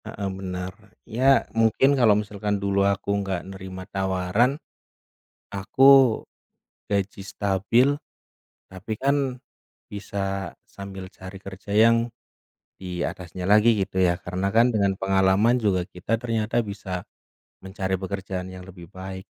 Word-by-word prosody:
Heeh, 100 -2 -4
bener. 90 -1 -5 0.3
Ya, 130 +4 +3
mungkin 115 +5 +3
kalau 115 -6 +4
misalkan 105 0 -2
dulu 100 0 0
aku 100 0 -1
nggak 95 -3 -2
nerima 95 -1 -8
tawaran, 95 +6 0 0.9
aku, 100 +6 -1 1.0
gaji 100 -1 -1
stabil, 100 +6 +2 0.9
tapi 95 +4 -7
kan, 140 +5 +1 0.8
bisa 100 -2 -3 0.2
sambil 95 -1 -9
cari 95 0 -11
kerja 95 +1 -11
yang 115 +1 +4 0.7
di 90 -2 -4
atasnya 90 0 -6
lagi 105 +4 +5
gitu 95 -1 -1
ya. 90 -1 +3
Karena 95 +2 -2
kan, 120 +2 +5
dengan 100 -3 +1
pengalaman 95 +5 +3
juga 95 -4 +1
kita 90 +6 -2
ternyata 115 -1 -2
bisa, 100 -3 -5 0.6
mencari 95 0 -4
pekerjaan 95 -1 -4
yang 95 0 -9
lebih 90 -3 -12
baik. 95 0 -7
100 Hz, 120 wpm, -24 LUFS, 95-105 Hz, 1.0 s, lagi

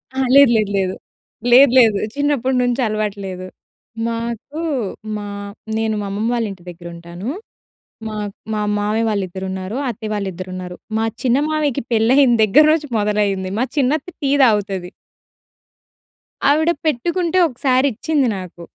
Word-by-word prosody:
అహా! 265 0 +1
లేదు. 280 -3 +8
లేదు. 215 -2 +1
లేదు. 190 -1 -1 0.6
లేదు. 265 +1 +8
లేదు. 220 -4 +5 0.2
చిన్నప్పటి 280 -3 0
నుంచి 245 +1 0
అలవాటు 215 -1 -2
లేదు. 185 -1 -6 0.6
మాకు 235 +5 -4 0.6
మా 205 - -6 0.5
నేను 220 -1 0
మా 205 - -4
అమ్మమ్మ 210 +3 -1
వాళ్ళ 235 -1 0
ఇంటి 185 -3 -12
దగ్గరుంటాను. 170 +3 -8 0.8
మా, 215 - -5 0.4
మా 215 - -1 0.2
మామయ్య 215 +2 0
వాళ్ళ 205 -2 0
ఇద్దరు 190 +2 -6
ఉన్నారు. 190 +3 -5
అత్తయ్య 220 -2 -5
వాళ్ళ 205 -1 -2
ఇద్దరు 185 +1 -8
ఉన్నారు. 180 -1 -7 0.2
మా 220 - +1 0.2
చిన్న 250 0 +3
మామయ్యకి 295 -3 0
పెళ్లయిన 245 +4 +4
దగ్గర 245 +9 +6
రోజు 310 -2 0
మొదలైంది. 205 -2 0
మా 250 - +2
చిన్నత్త 285 +3 +1 0.2
టీ 275 - +1
తాగుతది. 200 -5 +1 1.6
ఆవిడ 315 +3 +3 0.2
పెట్టుకుంటే 340 +5 0
ఒకసారిచ్చింది 265 +1 +1
నాకు. 180 -2 -9
225 Hz, 135 wpm, -19 LUFS, 195-265 Hz, 1.6 s, లేదు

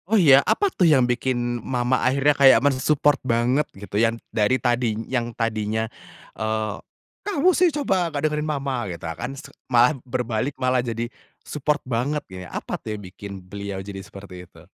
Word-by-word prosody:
Oh 220 - +4
iya, 140 -8 +7
apa 410 - +1
tuh 175 -3 +3
yang 135 -5 +5
bikin 120 -1 -1
mama 125 0 0
akhirnya 140 +3 +3
kayak 140 -2 +7
men-support 145 +1 +2
banget 125 +4 +1
gitu, 100 +1 -2
yang 115 0 +2 0.2
dari 110 +4 +2
tadi 120 -3 0
yang 120 -2 -1
tadinya, 110 -1 -1 0.5
eee, 110 -1 -2 0.5
"Kamu 370 -3 +2
sih 360 0 +4
coba, 195 - 0
nggak 150 -1 -2
dengerin 150 0 -1
mama!" 135 -6 -2
gitu 85 -1 -7
kan, 85 +9 -5
s 155 - -10 0.2
malah 125 +3 +5
berbalik 125 +1 -2
malah 130 -1 +1
jadi 115 -1 -3 0.4
support 150 0 -1
banget 130 +5 -1
ya, 90 -1 -8
apa - - -5
tuh 110 -1 -5
yang - - -10
bikin 100 0 -9
beliau 100 +1 -6
jadi 100 -1 -7
seperti 90 -2 -11
itu? 80 - -17
125 Hz, 170 wpm, -23 LUFS, 110-145 Hz, 0.5 s, iya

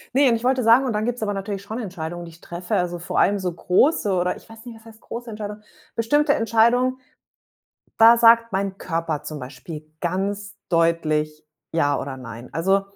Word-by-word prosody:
Ne 275 0 +5
und 230 - +3
ich 225 - -5
wollte 260 0 +2
sagen 235 +4 +6
und 245 - 0
dann 210 +1 -1
gibt's 245 -2 -2
aber 205 -1 -1
natürlich 195 0 -4
schon 220 +4 -6
Entscheidungen, 175 -4 -5
die 165 - -11
ich 165 - -18
treffe, 175 +4 -4
also, 175 -2 -1
vor 175 - -4
allem 200 0 +3
so 180 -2 -2
große 200 - +2
oder 180 0 0
ich - - -16
weiß 225 +1 -13
nicht, 235 - -9
was 220 - -19
heißt 220 0 -14
große 235 0 -7
Entscheidung, 210 -1 -6 0.3
bestimmte 290 +6 +2
Entscheidungen, 235 +3 +2 1.0
da 230 +1 +8
sagt 230 -1 +6
mein 195 0 -1
Körper 165 -3 -3
zum 155 -1 -6
Beispiel 150 +4 -8 0.2
ganz 200 +3 -3
deutlich 155 -2 +1 0.3
ja 145 -4 +1
oder 135 -1 -5
nein. 115 -1 -9
Also, 195 +6 +2
200 Hz, 195 wpm, -23 LUFS, 165-230 Hz, 1.0 s, da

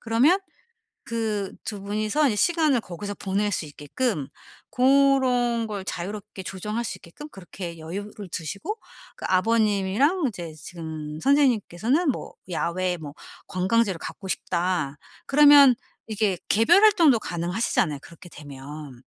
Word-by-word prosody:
그러면 250 +11 +3 0.7
그 215 -4 -2
2 205 -3 -5
분이서 215 +9 +1
이제 210 - -1
시간을 310 -6 +3
거기서 200 +3 -7
보낼 205 +2 -1
수 170 - -2
있게끔 150 - -3 0.4
고런 255 -3 +3
걸 200 -3 -5
자유롭게 200 +2 -6
조정할 210 +6 -4
수 - - -5
있게끔 295 - -11
그렇게 175 - -8
여유를 200 +4 -7
두시고 200 - -4 0.4
그 - - -6
아버님이랑 215 - +2
이제 170 -6 -7
지금 155 -2 -7
선생님께서는 270 - +2
뭐 - - -7 0.2
'야외에 180 +1 -1
뭐 145 -3 -9 0.3
관광지를 190 0 +1
가고 195 - -8
싶다.' 170 -7 -1 0.3
그러면 285 -2 +8 0.3
이게 210 -4 0
개별 335 - +5
활동도 335 - +6
가능하시잖아요 175 -4 -1
그렇게 170 +1 -14
되면. 145 -2 -10
205 Hz, 295 characters per minute, -25 LUFS, 175-245 Hz, 0.7 s, 그러면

